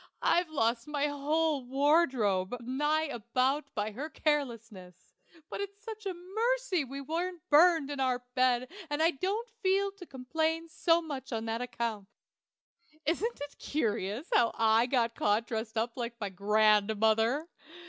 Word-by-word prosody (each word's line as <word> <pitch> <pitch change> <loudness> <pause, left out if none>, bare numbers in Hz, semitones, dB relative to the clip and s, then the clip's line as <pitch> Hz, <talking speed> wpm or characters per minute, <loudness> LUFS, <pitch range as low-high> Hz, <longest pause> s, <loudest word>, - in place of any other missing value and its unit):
I've 350 -1 +3
lost 235 -3 0
my 295 -1 0
whole 295 0 0
wardrobe, 255 - +2
nigh 295 +6 0
about, 260 +1 0
by 210 0 -1
her 275 +9 -5
carelessness; 230 - -3 0.3
but - - -5
it's 400 +1 -7
such 435 -2 -7
a 380 - -2
mercy 430 +1 0
we 275 +1 -7
wasn't 335 +4 -4
burned 315 -1 +5
in 285 - -5
our 250 -2 0
bed 255 -1 +2 0.2
that 290 0 -2
I 325 +2 +4
don't 395 - -2
feel 390 0 +2
to 390 -2 -12
complain 320 +5 -2
so 330 +1 +2
much 275 -5 -6
on 225 -1 -2
that 225 +1 -2
account. 230 -5 -3 1.0
Isn't 365 - -1
it 290 0 -7
curious 225 - -2
how 235 - +4
I 225 +1 +4
got 235 -3 +1
caught 210 +2 +1
dressed 220 -1 -4
up 230 +1 -1
like 235 -1 -5
my 205 -3 -3
grandmother? 215 - +2
270 Hz, 150 wpm, -30 LUFS, 230-320 Hz, 1.0 s, burned